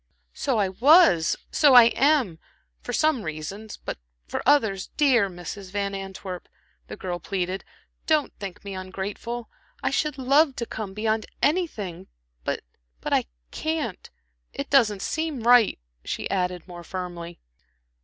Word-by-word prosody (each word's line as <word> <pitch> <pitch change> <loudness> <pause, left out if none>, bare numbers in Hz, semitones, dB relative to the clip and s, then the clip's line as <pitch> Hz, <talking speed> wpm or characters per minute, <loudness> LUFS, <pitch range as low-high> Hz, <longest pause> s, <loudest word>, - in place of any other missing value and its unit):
"So 260 -4 0
I 200 -3 +2
was, 240 - +5 0.2
so 285 -4 +5
I 235 -1 +9
am 270 - +3 0.4
for - - -5
some 305 0 +2
reasons; 190 +6 -6
but - - -6 0.3
for - - -3
others 220 -10 +3
Dear 250 -9 +4
Mrs. 185 +2 -8
Van 200 0 -2
Antwerp," 190 -2 -6 0.4
the - - -7
girl 175 -2 -4
pleaded, 185 +1 -3 0.4
"don't 310 -2 +2
think 195 -1 -7
me 200 - -5
ungrateful. 195 +5 -5 0.4
I - - +1
should 300 -2 0
love 275 +2 +4
to 235 - -3
come 205 -4 -6
beyond 220 0 0 0.2
anything, 210 - 0 0.4
but - - -2 0.4
but - - -3
I - - +3 0.3
can't. 310 - -3 0.4
It 280 - -5
doesn't 215 -8 +4
seem 315 -7 -2
right," 240 -3 +6 0.3
she - - -3
added, 180 -2 -1
more 175 -1 -9
firmly. 175 -2 -6
205 Hz, 140 wpm, -25 LUFS, 185-270 Hz, 0.4 s, I